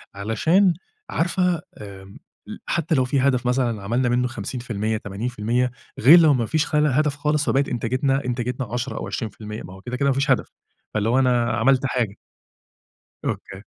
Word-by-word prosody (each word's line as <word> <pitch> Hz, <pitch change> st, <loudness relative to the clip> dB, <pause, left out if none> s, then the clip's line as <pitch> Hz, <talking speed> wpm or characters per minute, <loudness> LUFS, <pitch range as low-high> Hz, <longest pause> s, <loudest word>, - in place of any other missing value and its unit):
علشان 160 Hz, -, +2 dB, 0.4 s
عارفة 175 Hz, 0 st, 0 dB, 0.2 s
آمم 100 Hz, -1 st, -11 dB, 0.3 s
ل -, -, -7 dB
حتى 165 Hz, -1 st, 0 dB
لو 130 Hz, -1 st, +2 dB
في 135 Hz, +2 st, 0 dB
هدف 130 Hz, -2 st, +1 dB
مثلًا 120 Hz, -5 st, 0 dB
عملنا 120 Hz, +4 st, 0 dB
منُّه 125 Hz, +1 st, +1 dB
50% 110 Hz, -1 st, -3 dB
80% 115 Hz, +4 st, -2 dB, 0.3 s
غير 155 Hz, +9 st, +8 dB
لو 155 Hz, -3 st, +6 dB
ما 120 Hz, -3 st, 0 dB
فيش 155 Hz, +6 st, 0 dB
خلى 150 Hz, 0 st, +2 dB
هدف 145 Hz, +2 st, +1 dB
خالص، 150 Hz, 0 st, 0 dB
فبقت 140 Hz, +1 st, +1 dB
إنتاجتنا 130 Hz, +3 st, 0 dB
إنتاجتنا 125 Hz, +1 st, -2 dB
10 125 Hz, +2 st, -3 dB
أو -, -, -4 dB
20% 110 Hz, -1 st, -6 dB
ما 95 Hz, -, -10 dB
هو 95 Hz, -, -13 dB
كده، 125 Hz, +2 st, -5 dB
كده 140 Hz, +1 st, +2 dB
ما -, -, +3 dB
فيش 140 Hz, 0 st, +1 dB
هدف، 130 Hz, -, +1 dB, 0.4 s
فاللي 105 Hz, +1 st, 0 dB
هو 130 Hz, +3 st, +3 dB
أنا 120 Hz, -3 st, +2 dB
عملت 135 Hz, +3 st, +2 dB
حاجة. 120 Hz, -6 st, -1 dB, 1.1 s
أوكي. -, -, -5 dB
125 Hz, 170 wpm, -23 LUFS, 115-140 Hz, 1.1 s, غير